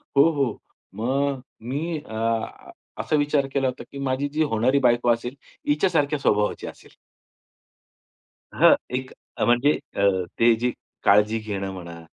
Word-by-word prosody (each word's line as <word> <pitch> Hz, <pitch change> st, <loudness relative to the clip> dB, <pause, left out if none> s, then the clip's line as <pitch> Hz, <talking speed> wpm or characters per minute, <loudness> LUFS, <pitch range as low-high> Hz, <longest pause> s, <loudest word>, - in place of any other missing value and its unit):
हो, 140 Hz, -, +2 dB
हो. 140 Hz, -8 st, -2 dB, 0.3 s
मग 135 Hz, +5 st, -1 dB, 0.3 s
मी 155 Hz, +5 st, -2 dB
अ, 115 Hz, -3 st, -3 dB, 0.3 s
असा 155 Hz, -, 0 dB
विचार 145 Hz, -1 st, +1 dB
केला 135 Hz, -1 st, +1 dB
होता 125 Hz, -, -5 dB
की 140 Hz, -, -9 dB
माझी 135 Hz, +1 st, -1 dB
जी 155 Hz, +2 st, 0 dB
होणारी 130 Hz, 0 st, +2 dB
बायको 120 Hz, -2 st, +3 dB
असेल, 120 Hz, +3 st, -4 dB, 0.3 s
हिच्या 150 Hz, +6 st, +2 dB
सारख्या 145 Hz, +1 st, +1 dB
स्वभावाची 105 Hz, -6 st, 0 dB
असेल. -, -, -12 dB, 1.6 s
हां, -, -, +6 dB, 0.2 s
एक 130 Hz, 0 st, -5 dB, 0.3 s
अ, -, -, 0 dB
म्हणजे 120 Hz, +5 st, +4 dB, 0.2 s
अ, -, -, -1 dB, 0.4 s
ते 115 Hz, 0 st, +5 dB
जे 125 Hz, +1 st, +1 dB, 0.3 s
काळजी 105 Hz, +2 st, +4 dB
घेणं 100 Hz, -3 st, -4 dB
म्हणा 85 Hz, -2 st, -9 dB
130 Hz, 145 wpm, -24 LUFS, 110-140 Hz, 1.6 s, हां